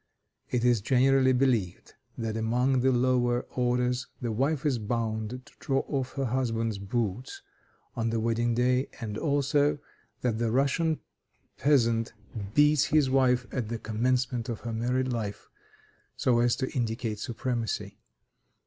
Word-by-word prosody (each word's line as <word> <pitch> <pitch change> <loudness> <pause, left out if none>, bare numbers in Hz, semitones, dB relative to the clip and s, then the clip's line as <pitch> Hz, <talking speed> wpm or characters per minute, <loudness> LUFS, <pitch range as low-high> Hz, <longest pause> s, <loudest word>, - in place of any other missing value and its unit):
It 125 -1 0
is 120 -4 +3
generally 130 +3 +4
believed 125 -9 0 0.2
that 115 -2 -3
among 125 +4 +1
the 130 +1 +3
lower 125 -1 +2
orders 125 0 0
the 120 -2 -2
wife 135 +6 0
is 135 -5 +1
bound 110 0 -2 0.2
to - - -18
draw 135 -1 0
off 135 -3 -3
her 135 -1 -2
husband's 115 -4 -1
boots 110 +3 -3 0.5
on 115 -1 -1
the 115 0 0
wedding 115 +1 0
day, 125 +2 +2
and 110 -4 -4
also 145 +2 +1 0.4
that 115 -3 0
the 115 -1 +1
Russian 140 +6 +1 0.6
peasant 115 -6 +2 0.4
beats 150 -1 +5
his 145 -4 +2
wife 125 -2 +3
at 120 -5 -3
the 115 - -2
commencement 125 +2 -1
of 115 - -4
her 115 -1 -4
married 125 +3 0
life, 105 -4 -5 0.7
so 120 -2 +2
as 120 0 +3
to 130 - -3
indicate 115 -3 -2
supremacy. 110 -3 -3
125 Hz, 140 wpm, -28 LUFS, 115-130 Hz, 0.7 s, beats